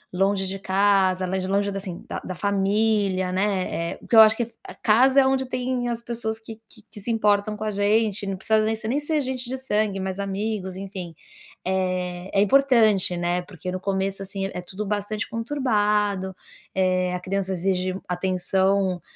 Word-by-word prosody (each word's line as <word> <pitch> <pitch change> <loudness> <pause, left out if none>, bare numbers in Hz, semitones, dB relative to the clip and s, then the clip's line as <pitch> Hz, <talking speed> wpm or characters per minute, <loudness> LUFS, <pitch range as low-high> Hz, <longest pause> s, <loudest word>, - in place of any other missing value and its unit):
longe 195 +1 +1
de 195 +1 -4
casa, 190 -1 +2
lé 190 +1 -1
longe 200 +1 +1
da, 195 - -3
assim, 185 -3 -7
da - - -4
da 185 - -6
família, 200 -1 +1
né, 185 -3 -1
eh, - - -11
porque 235 - -2
eu 220 - +11
acho 220 0 +6
que 235 - 0 0.4
casa 260 +5 +5
é - - +3
onde 265 0 +2
tem 250 -1 -1
as 235 0 -4
pessoas 225 -2 -4
que 225 0 -11
que 215 -3 -16
que 210 - -10
se 220 - -5
importam 210 -1 +2
com 215 - -5
a 215 - -1
gente, 205 0 +1
não 195 -1 -2
precisa 220 +2 +2
nesse 220 0 -2
nem 270 +5 +1
ser 300 0 0
gente 255 -2 -4
de 260 - -2
sangue, 210 -6 0
mas 190 0 -3
amigos, 200 -1 -3
enfim, 190 -4 -7 0.5
eh, 185 -1 -1
é 195 - +3
importante, 215 -6 +4
né, 175 +1 0
porque 180 -1 -7
no 185 - -3
começo, 195 0 -2
assim, 195 0 -4
é 180 - -4
tudo 195 +4 -6
bastante 205 +1 -2
conturbado, 210 -6 0 0.4
eh, 185 -1 +2
a - - -3
criança 190 +1 -2
exige 185 0 -1
atenção 185 +1 +1
200 Hz, 180 wpm, -24 LUFS, 190-220 Hz, 0.5 s, eu